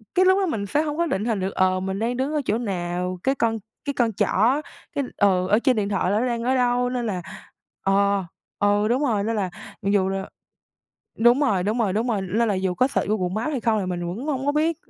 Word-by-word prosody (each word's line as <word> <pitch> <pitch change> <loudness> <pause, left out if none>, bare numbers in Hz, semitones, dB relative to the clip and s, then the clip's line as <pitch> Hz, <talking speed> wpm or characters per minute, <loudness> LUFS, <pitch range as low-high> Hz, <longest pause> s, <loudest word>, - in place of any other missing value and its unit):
cái 370 - +5
lúc 375 +1 +5
đó 385 - +2
mình 220 - -2
sẽ 290 +10 +1
không 300 -1 -3
có 340 - +2
định 210 - -1
hình 225 -4 0
được, 190 +1 -2
ờ, 185 0 +2
mình 190 +1 -3
đang 240 +2 -1
đứng 270 +4 -1
ở 300 - +1
chỗ 215 - +1
nào, 180 -4 -3
cái 270 +1 +2
con 225 -2 0 0.3
cái 280 - -1
con 230 -4 +1
trỏ 235 +10 +2 0.3
cái 280 - 0
ừ, 185 -3 +3
ở 210 +4 +4
trên 260 0 +2
điện 205 -2 -1
thoại 185 -2 0
là 205 - +2
nó 245 - +1
đang 235 -2 -1
ở 260 +2 +2
đâu 245 0 +2
nên 250 -1 -2
là, 190 -5 -2 0.6
ờ 200 0 +2 0.3
ừ, 205 +1 +3
đúng 250 +5 +1
rồi, 215 -7 +1
nên 225 +1 -1
là 190 -3 -1 0.3
mặc 195 - -1
dù 190 -1 +2
là 195 0 -3 0.9
đúng 240 +4 +5
rồi, 205 -11 +2
đúng 215 +5 -1
rồi, 205 -5 +1
đúng 225 +4 0
rồi, 210 -5 0
lên 215 +5 0
là 200 - +1
dù 185 -1 -1
có 255 +8 +2
search - - -1
Google 205 -4 0
Maps 225 +8 -1
hay 275 -5 -2
không 220 -2 +1
thì 190 - -3
mình 175 -1 -3
vẫn 225 - -5
hông 275 -2 -2
có 285 - +3
biết 315 +1 +1
220 Hz, 260 wpm, -23 LUFS, 195-255 Hz, 0.9 s, cái